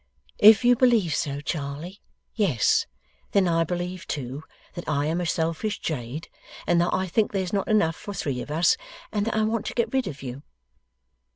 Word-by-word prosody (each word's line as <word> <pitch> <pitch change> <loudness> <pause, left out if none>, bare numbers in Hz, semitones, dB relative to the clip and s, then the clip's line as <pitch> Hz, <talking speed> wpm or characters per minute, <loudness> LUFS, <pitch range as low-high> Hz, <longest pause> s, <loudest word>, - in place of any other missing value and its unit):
'If 215 +2 +8
you 245 0 +6
believe 230 - +3
so, 140 -1 -2
Charley, 150 +5 -5 0.3
yes, 185 - +2 0.5
then 195 -2 +4
I 165 -1 +2
believe 180 +2 -4
too, 135 0 -4 0.3
that 175 - -6
I 145 -1 +1
am 165 +3 0
a 175 - -2
selfish 165 +6 -1
jade, 145 +1 -4 0.4
and 170 0 +3
that 175 - +2
I 185 - 0
think 205 +4 +1
there's 190 -2 -2
not 200 -1 0
enough 185 -7 +2
for 205 - -7
three 135 -8 -2
of - - -8
us, 165 +3 +3 0.3
and 210 0 -1
that 230 - -1
I 220 - +2
want 220 0 -1
to - - -4
get 235 - 0
rid 265 -4 +1
of 140 -6 -7
you. 130 +1 -6
175 Hz, 190 wpm, -25 LUFS, 150-205 Hz, 0.5 s, If